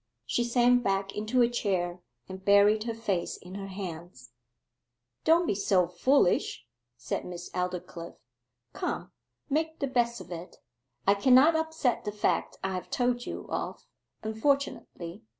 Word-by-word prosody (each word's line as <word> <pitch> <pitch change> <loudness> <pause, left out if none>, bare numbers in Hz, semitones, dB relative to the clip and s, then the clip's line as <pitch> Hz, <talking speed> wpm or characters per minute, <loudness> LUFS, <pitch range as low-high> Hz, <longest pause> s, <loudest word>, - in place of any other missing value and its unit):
She 240 - +1
sank 245 +1 +4
back 195 -2 0
into 220 +4 +2
a - - +5
chair, 185 -7 -1 0.3
and 190 0 -8
buried 205 +2 +5
her 230 - -2
face 200 -6 -2
in 180 +1 -12
her 195 0 -5
hands. 170 - -8 0.9
'Don't 335 +2 +5
be - - +1
so 190 -2 +2
foolish,' 180 +4 +2 0.3
said 120 - -3
Miss 175 0 -8
Aldclyffe. 180 -2 -4 0.6
'Come, - - -3 0.4
make 320 +2 0
the - - -1
best 240 -3 +1
of 185 -1 -11
it. 175 +1 -7 0.5
I 200 - +6
cannot 260 +9 +6
upset 320 -6 0
the 210 - -3
fact 210 0 0
I 190 0 -1
have 185 - -5
told 245 -1 0
you - - -5
of, - - -4 0.4
unfortunately. 220 -7 -1
205 Hz, 145 wpm, -29 LUFS, 180-245 Hz, 0.9 s, I